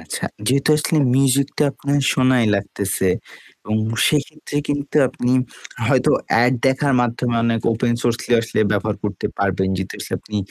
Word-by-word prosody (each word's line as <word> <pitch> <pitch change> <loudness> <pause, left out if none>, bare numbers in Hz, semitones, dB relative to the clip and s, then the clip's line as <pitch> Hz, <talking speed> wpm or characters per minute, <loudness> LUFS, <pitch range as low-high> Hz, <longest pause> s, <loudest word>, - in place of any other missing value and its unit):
আচ্ছা। - - -5 0.2
যেহেতু 135 +5 +2
আসলে 155 +1 0 0.2
মিউজিক 135 0 +3
টা 150 - +4
আপনার 140 0 -1
শোনাই 130 -2 +3
লাগতেছে 100 -1 -1 0.5
এবং 105 +2 -2 0.3
সেক্ষেত্রে 150 0 -2
কিন্তু 145 +1 -2
আপনি 125 0 -1 0.5
হয়তো - - +3 0.3
এড 125 - +4
দেখার 135 +1 +2
মাধ্যমে 120 0 -1
অনেক 115 -1 +1
ওপেন 120 +1 0
সোর্স 120 -1 +1
গুলি - - 0
আসলে 115 -1 -2
ব্যবহার 105 0 -1
করতে 100 -2 -3
পারবেন। 95 -1 0
যেহেতু 95 0 -5
আসলে - - -5
আপনি 105 - -6
125 Hz, 155 wpm, -20 LUFS, 105-140 Hz, 0.5 s, টা